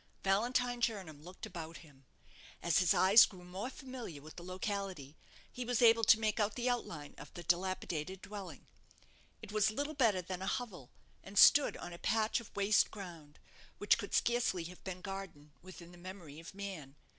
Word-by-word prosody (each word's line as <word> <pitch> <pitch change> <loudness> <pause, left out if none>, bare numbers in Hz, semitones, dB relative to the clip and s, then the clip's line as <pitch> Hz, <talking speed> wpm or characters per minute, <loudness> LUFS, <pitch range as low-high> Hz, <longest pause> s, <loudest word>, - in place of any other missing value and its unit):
Valentine 240 +5 +1
Jernam 190 -11 -2
looked 180 +6 -9
about 170 -5 -7
him. 135 -3 -21 0.6
As 170 -1 +3
his 180 -3 +3
eyes 200 +5 +7
grew 185 -2 -13
more 185 +7 -5
familiar 255 - -8
with 155 +2 -12
the - - -9
locality, 185 -5 -4 0.4
he 250 - -5
was 245 -1 0
able 230 -1 +6
to 220 - +7
make 215 0 0
out 210 0 +1
the 245 0 -2
outline 165 -12 -3
of 150 - -11
the 175 - -7
dilapidated 180 0 -1
dwelling. 195 -7 -8 0.8
It - - -8
was 215 0 +3
little 285 +8 -3
better 225 -10 +2
than 185 +1 -5
a 190 - -3
hovel, 190 - -4 0.3
and 195 +1 -10
stood 290 0 +7
on 175 - -7
a 170 - -10
patch 220 +1 +1
of 235 - -11
waste 200 +1 +3
ground, 170 -7 -10 0.4
which 205 - +3
could 200 - -3
scarcely 235 -7 +1
have 180 +2 -10
been 185 -1 -6
garden 180 -7 -8
within 175 -1 -12
the 175 - -15
memory 175 -5 -9
of 165 +3 -11
man. 185 -9 -7
190 Hz, 180 wpm, -34 LUFS, 170-220 Hz, 0.8 s, eyes